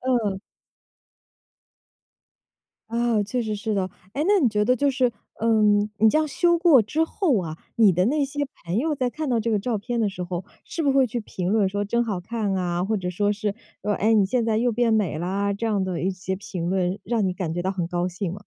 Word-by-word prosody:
嗯。 235 -7 0 2.5
啊， 235 -1 +1
确 245 +5 -2
实 215 -2 -2
是 215 +1 -2
的。 190 -2 -1 0.2
诶， 290 - -1
那 410 0 +5
你 265 -8 +3
觉 210 -1 +1
得 250 - +4
就 285 +3 +2
是， 255 -2 +1 0.3
呃， 230 - 0 0.5
你 220 +1 +5
这 - - +2
样 310 0 +1
修 345 +4 +2
过 330 -8 +6
之 300 +10 0
后 325 - +1
啊， 160 -2 -6 0.2
你 220 -4 +6
的 180 +1 +2
那 290 +5 +2
些 285 +1 -3 0.2
朋 175 +4 -1
友 305 +5 +1
在 255 -2 0
看 310 +2 -4
到 240 -2 +2
这 225 +1 -1
个 215 - +3
照 225 +1 -1
片 235 +4 -3
的 215 -3 +2
时 185 -2 -6
候， 180 0 -4 0.2
是 330 - -4
不 285 - +3
是 - - -1
会 265 -1 +5
去 240 +1 -3
评 185 -4 -3
论 210 -2 +3
说 205 +1 -2
“真 235 +4 +1
好 210 -6 -2
看 210 +1 -2
啊”， 175 -1 -1
或 215 +2 0
者 180 -2 -3
说 205 +3 +1
是 210 -1 -2 0.3
说 210 - -1
“哎， 220 +3 +2
你 210 -3 +4
现 235 +4 0
在 220 -1 +1
又 240 +2 +2
变 230 0 +2
美 200 -8 +1
啦” 195 +4 -1
这 215 +3 -4
样 205 -3 +1
的 185 -3 -3
一 190 - +1
些 190 0 -4
评 180 -3 -4
论， 185 +1 0
让 225 -3 0
你 185 - 0
感 180 -4 -3
觉 175 - -2
到 190 +2 -1
很 180 -3 -2
高 175 0 -1
兴 180 0 -4
吗？ 200 - -9
210 Hz, 255 characters per minute, -24 LUFS, 190-240 Hz, 2.5 s, 过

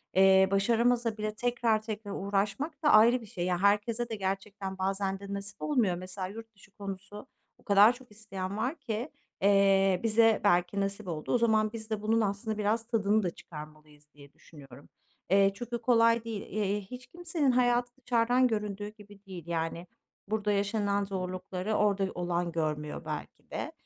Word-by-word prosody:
eee, 190 0 +6
başaramasa 230 +2 +2
bile 215 0 -3
tekrar 235 -2 +1
tekrar 215 -2 -6
uğraşmak 200 - -2
da 295 - +4
ayrı 235 +3 +6
bir - - -10
şey. 180 -3 -4
Ya, 180 -1 +1
herkese 220 +4 +2
de 225 - -3
gerçekten 195 0 -4
bazen 195 0 -1
de 200 0 -7
nasip 200 +1 -6
olmuyor. 235 -12 +1
Mesela 185 +1 -6
yurt 225 +2 -10
dışı 195 - -20
konusu, 200 +1 -8 0.3
o - - -25
kadar 205 +4 +6
çok 245 -3 -16
isteyen 200 -2 -6
var 265 +8 -2
ki, 235 +1 -4 0.3
eee, 195 -1 +4
bize 225 0 +4
belki 180 0 +2
nasip 195 0 -3
oldu. 155 +3 -3
O - - +5
zaman 220 -1 +2
biz 220 -1 -7
de 215 -1 -2
bunun 225 +1 +2
aslında 210 +2 -2
biraz 220 +2 0
tadını 215 -2 +2
da 175 - 0
çıkarmalıyız 150 -2 -13
diye 140 -1 -16
düşünüyorum. 140 -4 -15 0.4
Eee, 195 0 +4
çok 240 +3 -8
da 235 - 0
kolay 230 -1 +4
değil. 225 -3 -5
Eee, 205 0 -2
hiç 250 +5 -10
kimsenin 330 -4 -1
hayatı 245 0 +2
dışarıdan 245 +1 +3
göründüğü 210 -2 -3
gibi 205 -1 -16
değil. 175 -4 -9
Yani, 165 +1 -3 0.4
burada 210 -1 0
yaşanılan 205 0 0
zorlukları 185 +1 -4
orada 200 -2 +2
olan 175 -1 -1
görmüyor 150 -2 -3
belki - - -7
de. - - -4
205 Hz, 170 wpm, -29 LUFS, 190-225 Hz, 0.4 s, eee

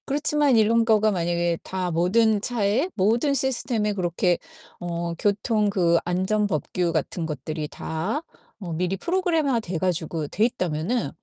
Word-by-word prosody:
그렇지만 295 -2 +2
이런 225 +1 +4
거가 215 -1 +3
만약에 170 -2 0
다 185 -2 -3
모든 205 +6 +3
차에 235 - 0
모든 230 +8 +2
시스템에 240 -5 0
그렇게 175 -1 0 0.4
어 170 -1 -3
교통 210 +3 +1
그 175 -4 +3
안전 190 +4 +1
법규 175 +1 -1
같은 165 +3 -2
것들이 155 +1 -4
다 185 - -3 0.4
어 170 -2 -4
미리 180 +3 -1
프로그램화 325 - +1
돼 180 -6 -4
가지고 165 -3 -1
돼 210 +9 +1
있다면은 185 0 -1
195 Hz, 300 characters per minute, -24 LUFS, 170-230 Hz, 0.4 s, 이런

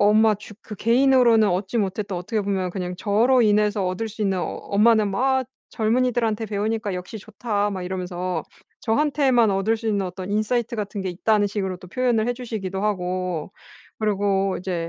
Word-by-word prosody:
...엄마 215 +1 +5
주 210 0 -12
그 210 - -8
개인으로는 235 -2 +4
얻지 190 +5 -1
못했던 200 -1 -1
어떻게 210 +5 -2
보면 190 -2 -1
그냥 180 -1 -4
저로 235 +6 +3
인해서 210 -1 +2
얻을 185 +5 -2
수 215 +1 -6
있는 195 -2 +1
엄마는 210 +3 +2
막 260 +5 +1 0.3
"젊은이들한테 225 -1 0
배우니까 210 0 -2
역시 180 +4 -6
좋다." 205 -1 -2
막 190 -2 -4
이러면서 180 -2 -3 0.4
저한테만 260 -2 +2
얻을 195 +4 +1
수 225 0 -4
있는 200 -3 0
어떤 185 +2 -7
인사이트 230 +3 0
같은 205 -1 -4
게 190 - -3
있다는 205 +3 +1
식으로 190 -3 -3
또 180 - -13
표현을 240 0 +1
해 245 - +2
주시기도 215 -6 -5
하고 185 -3 -2 0.5
그리고 200 -2 +1
이제 175 -3 -3
210 Hz, 380 characters per minute, -23 LUFS, 190-225 Hz, 0.5 s, 엄마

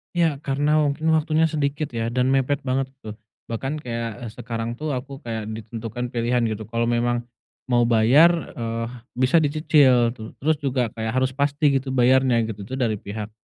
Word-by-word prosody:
Ya, 165 -4 +2
karena 145 +2 +1
mungkin 150 +2 -1
waktunya 160 +1 +2
sedikit 150 -1 -1
ya 115 0 -1
dan 125 +1 +1
mepet 135 +1 +1
banget 130 +1 0
tuh. 110 -3 -8 0.3
Bahkan 135 +6 -3
kayak, 115 -3 -5
eee, 110 - -8
sekarang 115 -1 -4
tuh 155 +4 -4
aku 135 +2 -6
kayak 110 -2 -4
ditentukan 115 +2 -5
pilihan 120 0 0
gitu. 110 -2 -3
Kalau 115 +1 -1
memang 120 0 0 0.5
mau 120 -1 +4
bayar, 140 +9 +4
eee, 115 -1 -3 0.3
bisa 130 +6 +4
dicicil. 145 -6 +4
Tu 110 -2 -10
terus 155 +1 0
juga 130 -5 -1
kayak, 110 +2 -4
harus 130 0 +1
pasti 140 0 +2
gitu 130 0 -5
bayarnya, 125 -1 +4
gitu. 105 -2 -6
Itu 130 - -4
dari 115 -6 -1
pihak, 105 +1 -6
125 Hz, 175 wpm, -23 LUFS, 115-140 Hz, 0.5 s, mau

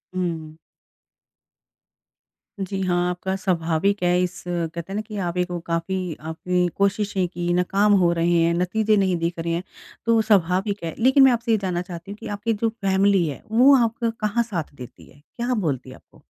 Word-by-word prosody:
हुँ। 165 -4 -3 2.0
जी, 195 0 -3
हाँ। 175 -1 +1
आपका 185 +2 -3
स्वाभाविक 185 +1 0
है 175 0 +3
इस 180 0 -3
कहते 170 -1 -3
हैं - - -4
ना 210 - -1
कि 215 -1 -8
आप 180 -2 -2
ही 180 - +3
को 175 -1 -5
काफ़ी 170 +1 -3
आपने 180 +2 0
कोशिशें 200 -1 +1
कीं, 175 0 -2
नाकाम 195 +4 +2
हो 175 -2 +3
रहे 170 0 +1
हैं, 165 +1 +3
नतीजे 210 +5 +1
नहीं 190 -2 +2
दिख 170 +1 -2
रहे 165 0 -2
हैं, 170 +2 -2 0.4
तो 230 -1 +4
स्वाभाविक 200 -1 +1
है। 165 - -3
लेकिन 265 +4 +5
मैं 265 - +7
आपसे 230 -1 -1
ये 220 - +4
जानना 185 -3 -2
चाहती 180 +1 -8
हूँ 205 - -8
कि 230 - -9
आपकी 210 +3 -2
जो 225 +2 0
फैमिली 195 -3 +2
है, 145 - -6
वो 255 +5 +6
आपका 230 +1 -1 0.2
कहाँ 215 +3 +1
साथ 175 -10 -5
देती 125 -2 -12
है? 145 - -20
क्या 240 - -4
बोलती 145 - -2
है 130 - -10
आपको? - - -22
185 Hz, 190 wpm, -23 LUFS, 170-210 Hz, 2.0 s, मैं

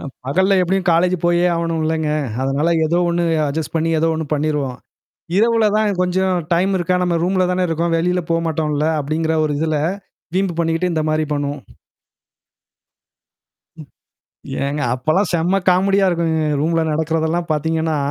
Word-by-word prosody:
அ - - -10 0.2
பகல்ல 190 +8 +2
எப்டியும் 190 +1 0
காலேஜ் 180 +2 +2
போயே 175 0 +3
ஆகணும்லங்க. 160 -2 -1 0.3
அதனால 140 +4 0 0.2
ஏதோ 170 +3 +1
ஒண்ணு 170 0 0 0.2
அட்ஜஸ்ட் 160 +2 -4
பண்ணி 165 +1 0
ஏதோ 165 +1 +2
ஒண்ணு 160 0 -3
பண்ணிருவோம். 145 -4 -1 0.6
இரவுல 225 +1 +3
தான் 205 -4 0
கொஞ்சம் 185 +1 +1 0.2
டைம் 185 +3 +1
இருக்கா. 180 +1 0
நம்ம 175 -1 0
ரூம்ல 185 0 +1
தானே 180 0 0
இருக்கோம். 165 +1 -1
வெளில 180 +2 0
போமாட்டோம்ல 160 -2 0
அப்டிங்கிற 160 +3 -1
ஒரு 150 - -1
இதுல. 155 -1 0 0.6
வீம்பு 190 -3 0
பண்ணிக்கிட்டு 165 +2 0
இந்த 155 -1 0
மாரி 155 0 0
பண்ணுவோம். 145 -1 -3 2.2
ம். 150 -4 -11 0.8
ஏங்க! 145 +1 -2
அப்பலாம் 155 +9 0
செம்ம 175 +3 +1
காமெடியா 195 +2 +3
இருக்குங்க. 165 -2 0 0.2
ரூம்ல 165 +2 +1
நடக்கிறதெல்லாம் 160 +2 -1
பார்த்தீங்கன்னா, 160 +1 -1
165 Hz, 140 wpm, -19 LUFS, 155-180 Hz, 2.2 s, போயே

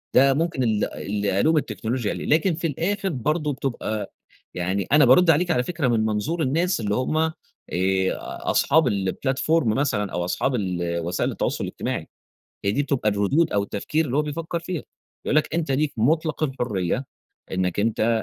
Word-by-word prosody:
ده 135 +1 +6
ممكن 160 -2 0
ال 110 -3 +1
اللي 100 -1 -1
ألوم 160 +5 +3
التكنولوجيا 120 -5 -2
عليه. - - -5
لكن 165 +4 +3
في 165 +1 -1
الآخر 190 +7 -1
برضه 150 +2 -1
بتبقى 120 -5 -3 0.4
يعني 95 +2 -1
أنا 150 0 +7
بارُد 150 +8 +6
عليكِ 170 +3 +4
على 125 -6 +2
فكرة 160 -4 -1
من 115 -3 +2
منظور 110 +11 -1
الناس 165 +6 +1
اللي 105 -2 -1
هم 130 +5 0
آآ 160 0 +2 1.2
أصحاب 150 -1 +3
الplatform 130 - 0
مثلًا 110 -4 0
أو 90 - -2
أصحاب 125 +8 0
ال 85 -5 -1
وسائل 85 +1 -1
التواصل - - -2
الاجتماعي. - - -4 0.6
هي 100 - +2
دي 145 - +1
بتبقى 140 -6 0
الردود 105 +11 +2
أو 100 - +2
التفكير 150 +11 -1
اللي 125 - -2
هو 150 - +3
بيفكّر 160 +3 -3
فيها، 170 -3 -4 0.4
يقول - - +1
لك 155 +1 +1
أنت 165 -4 -1
ليك 145 +2 +1
مُطلَق 155 +7 +1
الحرية 125 - -1 0.5
إنّك 95 +1 0
أنت 110 +1 +1
130 Hz, 170 wpm, -24 LUFS, 105-155 Hz, 1.2 s, أنا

